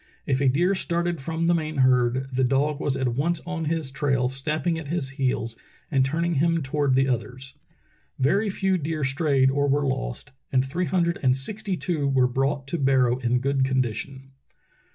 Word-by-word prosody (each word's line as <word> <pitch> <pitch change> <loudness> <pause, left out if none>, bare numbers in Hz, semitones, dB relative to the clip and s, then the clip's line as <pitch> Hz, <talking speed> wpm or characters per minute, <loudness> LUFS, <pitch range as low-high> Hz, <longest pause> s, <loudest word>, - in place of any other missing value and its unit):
If 135 -5 0
a 135 - +4
deer 175 +9 +2
started 170 -3 -1
from 165 +4 -2
the 170 - +4
main 155 -2 -2
herd 130 -1 +3
the 130 +1 +1
dog 140 +3 +1
was 135 -3 -1
at 130 -2 0
once 155 +8 0
on 170 -2 -3
his 160 -3 -2
trail, 135 -3 0
snapping 155 +5 -2
at 155 - -8
his 155 -3 -2
heels 130 -4 -2 0.4
and 135 -3 +3
turning 165 +5 0
him 165 +2 +1
toward 140 -1 +1
the 135 +1 +3
others. 125 +2 -4 0.6
Very 195 +11 +2
few 190 -1 0
deer 155 0 -3
stra3^ed 135 -1 +2
or 145 +1 +1
were 145 +1 +1
lost, - - -3 0.2
and 130 0 +2
three 170 +7 -2
hundred 170 -1 0
and 130 -2 +3
sixtj^ 200 +7 -3
two 155 -6 -1
were 135 -2 +3
brought 135 +2 -1
to 170 - -2
Barrow 130 -2 +3
in 120 -1 +1
good 135 0 +1
condition. 130 +1 -2
140 Hz, 185 wpm, -25 LUFS, 130-165 Hz, 0.6 s, a